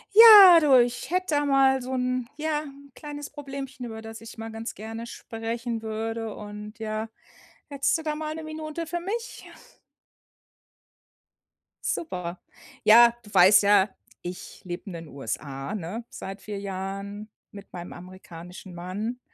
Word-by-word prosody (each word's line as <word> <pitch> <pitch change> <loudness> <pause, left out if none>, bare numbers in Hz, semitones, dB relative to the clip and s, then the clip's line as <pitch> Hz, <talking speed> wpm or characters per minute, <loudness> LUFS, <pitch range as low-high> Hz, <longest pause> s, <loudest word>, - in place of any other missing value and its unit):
Ja, 415 -6 +11
du, 280 -5 +6
ich 240 0 -5
hätte 365 -1 0
da 290 - +2
mal 270 -1 +4
so 260 +1 -4
‘n 255 -1 -1
ja, 305 -1 -1
‘n 280 -1 -13
kleines 290 +1 -8
Problemchen, 275 -3 -7
über 220 -1 -8
das 225 0 -9
ich 225 +1 -11
mal 225 0 -6
ganz 225 +1 -6
gerne 225 +2 -7
sprechen 230 0 -5
würde 225 0 -4
und 210 +1 -9
ja, 220 0 -4 0.6
hättest 275 -2 +1
du 320 - -8
da 305 -1 -1
mal 305 0 -4
1 320 +1 -6
Minute 310 +1 -5
für 345 +2 -3
mich? 450 +7 -5 2.4
Super. 180 - -3 0.5
Ja, 235 +2 +8
du 205 -1 -15
weißt 190 +2 +7
ja, 200 0 +5 0.3
ich 180 +1 -8
lebe 175 0 -6
in 195 - -7
den 165 -1 -8
USA, 135 - -5
ne, 210 +5 -5
seit 195 +1 -8
4 210 -1 -6
Jahren 200 +2 -6 0.2
mit 200 -1 -12
meinem 175 0 -7
amerikanischen 180 0 -11
Mann. 200 +8 -5
225 Hz, 150 wpm, -26 LUFS, 200-280 Hz, 2.4 s, Ja